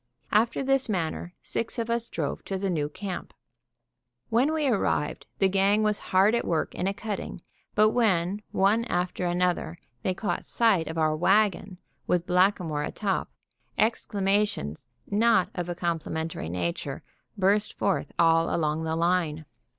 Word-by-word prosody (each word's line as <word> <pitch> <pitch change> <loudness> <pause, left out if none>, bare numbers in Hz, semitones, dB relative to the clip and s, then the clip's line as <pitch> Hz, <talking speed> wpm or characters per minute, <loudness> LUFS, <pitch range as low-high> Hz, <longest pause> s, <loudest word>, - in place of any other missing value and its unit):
After 225 +5 +2
this 270 -2 +2
manner 175 -2 -2
six 230 +2 -3
of 230 -1 -1
us 235 0 -1
drove 150 -4 -3
to 195 - -3
the 190 0 -1
new 150 -4 -1
camp. 190 +2 -6 0.9
When 245 +6 +3
we 315 -2 0
arrived 210 - 0
the 195 - +4
gang 195 +2 +3
was 210 -1 +1
hard 195 +4 +4
at 235 - +1
work 160 -2 -1
in 180 - -2
a - - +2
cutting; 205 -5 -5 0.3
but 215 +1 +5
when, 200 -4 +1
one 205 +4 +3
after 180 -3 -1
another, 175 - 0 0.2
they 185 - -1
caught 185 -2 -2
sight 210 -9 +2
of 160 - -5
our 155 -1 +2
wagon, 195 +2 +2 0.3
with 175 -1 +1
Blackamoor 180 -4 +2
atop, 195 +6 -2 0.5
exclamations, 200 - 0 0.2
not 205 -3 +3
of 175 -1 -4
a 175 - -2
complimentary 165 - -3
nature, 85 -1 -3 0.3
burst 200 +2 +2
forth 195 - 0
all 165 0 +4
along 155 0 0
the 160 0 -1
line. 165 -2 0
185 Hz, 150 wpm, -27 LUFS, 165-210 Hz, 0.9 s, but